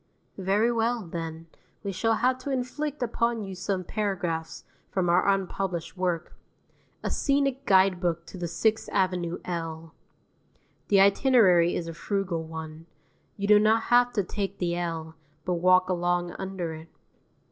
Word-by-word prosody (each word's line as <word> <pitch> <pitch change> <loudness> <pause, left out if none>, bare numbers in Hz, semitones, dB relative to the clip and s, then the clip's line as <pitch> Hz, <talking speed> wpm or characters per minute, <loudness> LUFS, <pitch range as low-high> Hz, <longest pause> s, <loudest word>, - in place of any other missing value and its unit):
Very 200 +5 +2
well, 230 -1 0
then, 165 -1 -6 0.4
we 200 - -2
shall 225 +4 +1
have 255 +3 +1
to 285 - -6
inflict 275 +2 -2
upon 235 -1 0
you 195 -1 -6
some 185 0 -2
paragraphs 175 -6 -3 0.3
from 180 -2 0
our 175 +3 +3
unpublished 190 -3 -1
work: 180 -2 -2 0.7
"A - - -1
Scenic 275 -1 0
Guidebook 180 -3 +3
to 185 - -10
the 175 - -2
Sixth 215 +7 0
Avenue 180 -3 0
L." 165 -2 -5 0.9
The 200 -1 +5
itinerary 195 -5 +5
is 170 - -3
a 165 - -5
frugal 190 -1 -2
one: 160 0 -8 0.5
you 200 0 -2
do 210 0 +7
not 220 +2 +3
have 245 0 +5
to 205 - +1
take 195 +1 -4
the 175 -1 -1
L, 165 -2 -4 0.3
but 180 - 0
walk 185 0 +5
along 175 -1 0
under 190 -4 -4
it. 160 +1 -10
185 Hz, 145 wpm, -27 LUFS, 170-215 Hz, 0.9 s, do